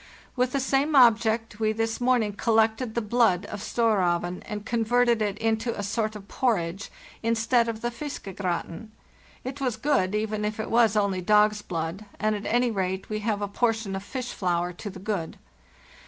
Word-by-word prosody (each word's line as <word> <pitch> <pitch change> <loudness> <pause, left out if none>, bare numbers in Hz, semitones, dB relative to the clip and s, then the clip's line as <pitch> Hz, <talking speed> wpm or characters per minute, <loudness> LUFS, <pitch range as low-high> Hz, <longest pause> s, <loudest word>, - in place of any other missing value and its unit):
With 250 0 +1
the 275 - 0
same 275 +3 +1
object, 225 -3 +4
we 215 -1 +1
this 225 +1 -2
morning 245 -4 +2
collected 220 +2 +1
the 235 - 0
blood 215 -5 +2
of 205 - -7
'Storraeven' 180 -7 +1
and 210 0 -5
converted 235 0 +2
it 205 -1 -1
into 225 +1 -1
a 205 - -3
sort 215 +1 -1
of 200 -1 -10
porridge 200 -7 -1 0.3
instead 230 +1 +2
of 225 -1 -5
the 240 - -1
'fiskegratin.' 205 - -5 0.5
It 265 +2 -6
was 250 -5 -1
good, 220 -7 +1
even 215 0 -1
if 210 +1 -2
it 215 - -4
was 230 -2 +4
only 200 -3 +1
dog's 210 +2 +4
blood, 170 +2 -4
and 215 -1 +1
at 205 - -5
any 240 +1 +2
rate 190 -2 -2
we 215 - -1
have 210 -1 -1
a - - -1
portion 220 -1 0
of 195 - -4
fish 250 +3 -5
flour 175 -1 -1
to 205 +4 -7
the 190 - -9
good. 190 -4 -3
220 Hz, 180 wpm, -26 LUFS, 200-235 Hz, 0.5 s, object